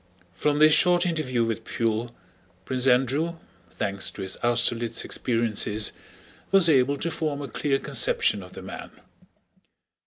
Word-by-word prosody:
From 145 +6 0
this 155 +1 +6
short 180 +1 +4
interview 150 -9 -1
with 115 0 -3
Pfuel, 115 +1 -2 0.5
Prince 130 0 -1
Andrew, 135 +7 +2 0.3
thanks 100 -1 -1
to 100 - -8
his 95 - -2
Austerlitz 120 -1 0
experiences, 110 -3 +1 0.6
was 195 -3 +5
able 140 -1 +3
to 170 +4 -3
form 155 -3 -3
a 140 - -5
clear 135 +3 -1
conception 475 - +1
of - - -13
the - - -10
man. - - -8
130 Hz, 135 wpm, -25 LUFS, 115-155 Hz, 0.6 s, this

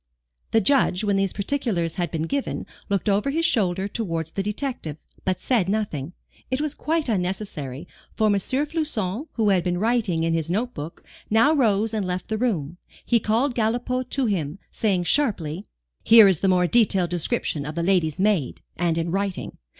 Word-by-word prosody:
The 225 - +3
Judge, 215 -4 +3
when 205 -1 +1
these 195 -1 +1
particulars 200 - -1
had 175 -2 -2
been 160 -2 -2
given, 275 +11 -2 0.2
looked 200 +1 0
over 205 +6 +2
his 325 +4 0
shoulder 190 - +1
towards 165 -7 -3
the 195 - -2
detective, 210 - -3 0.3
but 185 -1 0
said 215 -7 +1
nothing. 180 -8 -2 0.4
It 260 +1 -1
was 300 -1 -1
quite 320 0 -1
unnecessary, 180 - -3 0.3
for 220 - +2
M. 210 - +4
Floçon, 265 - -1
who 220 -3 +1
had 185 -3 +3
been 180 -1 0
writing 210 -6 +1
in 165 0 +1
his 165 -1 -1
note 235 +7 -1
book, 150 +2 -8 0.3
now 230 +8 +4
rose 225 -6 +2
and 210 -4 -1
left 180 0 -3
the 220 -1 -1
room. 175 - -1 0.3
He 235 - +3
called 235 +6 +1
Galipaud 245 +3 -1
to 270 -2 0
him, 175 -7 -1
saying 195 -5 0
sharply: 190 - 0 0.4
"Here 225 -2 +8
is 185 -5 +3
the 195 - +1
more 180 -1 +4
detailed 195 -4 +2
description 160 -3 -1
of 150 +2 -6
the 170 - -1
lady's 175 -4 +2
maid, 190 -9 +1
and 170 -1 +1
in 165 0 -1
writing. 195 0 -3
200 Hz, 180 wpm, -24 LUFS, 175-230 Hz, 0.4 s, Here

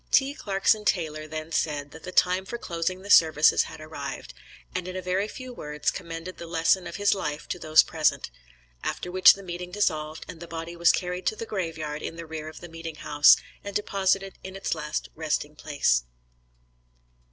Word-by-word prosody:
T. 275 +1 +4
Clarkson 205 -2 +1
Taylor 155 -6 -1
then 155 +1 -6
said, 145 -3 -1
that 160 - -11
the 185 - -7
time 185 +1 +3
for 235 +5 -5
closing 185 -1 -3
the 200 - -4
services 155 -3 +6
had - - -10
arrived, - - -7 0.4
and 185 -1 -3
in 185 - -6
a - - -2
very 185 +3 0
few 255 +3 -8
words 150 -8 -2
commended 170 +1 -7
the 170 - -7
lesson 165 +2 +2
of - - -7
his 205 0 +3
life 150 -5 -4
to 180 - -3
those 155 -1 +6
present, - - 0 0.5
after 180 - -3
which 185 0 +8
the 200 - -10
meeting 180 0 -6
dissolved, 155 -5 -1
and 175 - -9
the 170 - -8
body 165 +1 -6
was 170 0 +5
carried 180 0 -3
to - - +2
the 230 - -5
grave 180 -7 -3
yard 150 -1 -4
in - - -5
the 170 0 -7
rear 155 -1 -6
of 155 - -12
the 175 - -8
meeting 165 -1 -7
house, 150 0 +6 0.3
and 200 -1 -7
deposited 195 -1 0
in 190 0 -8
its 195 - -2
last 150 -1 -4
resting 150 -1 -2
place. 140 - +1
170 Hz, 195 wpm, -26 LUFS, 155-190 Hz, 0.5 s, which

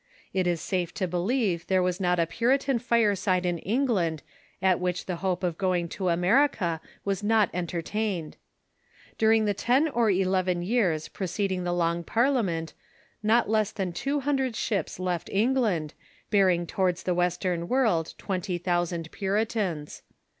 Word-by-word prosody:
It 185 -2 +1
is 175 -2 +1
safe 180 -3 -2
to 185 - -1
be 180 +1 -2
lieve 190 -3 0
there 185 -1 +2
was 180 +1 -1
not 180 -2 +1
a 165 - +3
Puritan 255 - +1
fireside 205 -6 +2
in 175 -1 0
England 195 - 0 0.4
at 185 -2 +2
which 180 0 -2
the 180 -2 -3
hope 185 0 -2
of 175 -3 -1
going 180 -3 +1
to 185 0 -2
America 180 - +2 0.2
was 200 0 -1
not 215 -1 +3
entertained. 180 0 -3 0.8
During 220 0 +4
the 205 - +1
ten 250 - +2
or 235 -7 +1
eleven 185 -2 +1
years 180 -7 +1
preceding 190 -1 -2
the 175 - 0
Long 170 -1 0
Parliament 205 - 0 0.5
not 225 +3 +3
less 215 -1 +2
than 190 -4 -3
two 275 +11 -1
hundred 265 -3 0
ships 195 -6 -2
left 180 -2 -2
England, 210 - +1 0.4
bearing 185 -4 +3
towards 180 0 -1
the 180 - 0
western 175 -1 0
world 220 -11 +1
twenty 185 -2 -3
thousand 175 -2 -1
Puritans. 195 -6 -2
185 Hz, 150 wpm, -27 LUFS, 175-220 Hz, 0.8 s, During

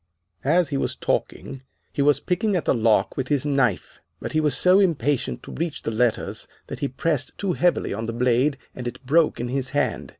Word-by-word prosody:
"As 165 +3 +3
he 140 - -1
was - - -1
talking 135 -1 -3 0.3
he - - -1
was 145 -1 +4
picking 195 +5 0
at 175 - -1
the - - +3
lock 110 -4 +2
with 130 -2 -2
his 145 -1 0
knife, 135 -9 0 0.2
but - - -5
he 155 - +1
was 150 -4 +1
so 185 +7 +5
impatient 145 - 0
to - - -9
reach 165 -1 -4
the - - -2
letters 115 +1 -1 0.2
that - - -7
he 140 - 0
pressed 140 0 -2
too 195 -3 -1
heavily 175 0 +1
on 110 +2 -4
the - - -2
blade 125 +4 +2 0.2
and 125 -1 -6
it 120 - -7
broke 155 +4 +3
in 120 +1 -3
his 130 0 -2
hand. 145 - -1
140 Hz, 210 wpm, -23 LUFS, 125-160 Hz, 0.3 s, so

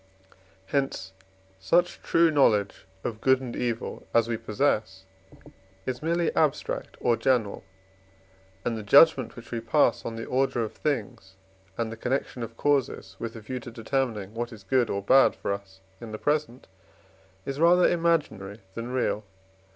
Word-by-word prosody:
Hence 115 -8 -2 0.5
such 175 - +1
true 165 -1 +3
knowledge 105 -10 +2 0.2
of 110 -2 -4
good 130 -1 +4
and 125 -3 -6
evil 120 -2 -3
as 115 -1 +4
we 120 - -1
possess 110 -4 -1 0.8
is 125 -1 -3
merely 170 +1 0
abstract 150 -3 0
or 120 -1 +2
general, 115 -3 0 1.0
and 120 - 0
the 110 - -4
judgment 130 +3 +5
which 120 - -12
we 120 - -2
pass 115 0 +2
on 115 - -5
the 115 - -5
order 130 -2 0
of 110 - -5
things 110 -9 -3 0.4
and 115 -1 -2
the 115 - -7
connection 125 +1 -2
of 115 0 -6
causes, 140 -3 0
with 115 - -5
a 115 - -8
view 125 +4 -5
to 120 - -9
determining 115 -3 -2
what 120 +1 -4
is 110 -4 -12
good 120 +4 +2
or 100 0 -2
bad 135 +6 +5
for - - -2
us 95 -1 -9 0.2
in 115 -2 -8
the 110 - -4
present, 145 -2 -1 0.8
is 135 +1 -4
rather 175 +2 +6
imaginary 145 - 0
than 115 +3 -5
real. 125 -4 0
120 Hz, 160 wpm, -27 LUFS, 110-135 Hz, 1.0 s, rather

